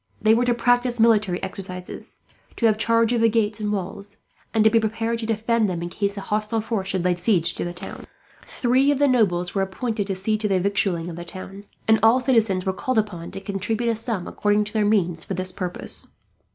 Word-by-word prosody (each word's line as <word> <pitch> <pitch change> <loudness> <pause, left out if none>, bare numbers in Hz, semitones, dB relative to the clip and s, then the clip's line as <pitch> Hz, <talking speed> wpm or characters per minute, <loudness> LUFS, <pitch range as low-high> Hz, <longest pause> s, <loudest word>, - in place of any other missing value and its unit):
They 220 +1 +4
were 240 +2 +2
to 240 -1 +2
practise 245 0 +1
military 215 -5 +3
exercises, 185 -1 -7 0.3
to 235 - 0
have 215 -1 +3
charge 230 +1 +3
of 235 - +1
the 230 - +5
gates 215 -1 0
and 210 -1 -2
walls, 200 +1 -5 0.3
and 220 -1 +3
to 220 - +6
be 230 - +4
prepared 225 +1 -1
to 225 - -4
defend 225 -1 +1
them, 170 -2 -3
in 175 - -4
case 200 +2 -2
a - - -3
hostile 215 +2 -1
force 215 -3 -3
should 190 -2 -1
lay 180 - +3
siege 175 -1 +2
to - - -4
the 175 0 -5
city. 195 - -8 0.3
Three 255 +3 +1
of 290 - +2
the 285 +1 +3
nobles 180 -9 +2
were 195 - 0
appointed 205 +2 -2
to 195 - -2
see 215 +3 -1
to 215 - 0
the 190 -2 +2
victualling 195 -3 0
of 170 -1 -7
the 175 - -6
town; 195 +3 -9 0.2
and 220 0 +5
all 225 +3 +5
citizens 225 -8 +2
were 190 - 0
called 255 +6 -2
upon 190 -6 -2
to 195 - -7
contribute 205 +4 -2
a - - -1
sum, 220 -4 -4
according 210 0 +1
to 210 - -8
their 215 -2 +2
means, 175 -6 +1
for 190 - -4
this 185 +1 -3
purpose. 180 -1 -3
210 Hz, 230 wpm, -23 LUFS, 190-225 Hz, 0.3 s, to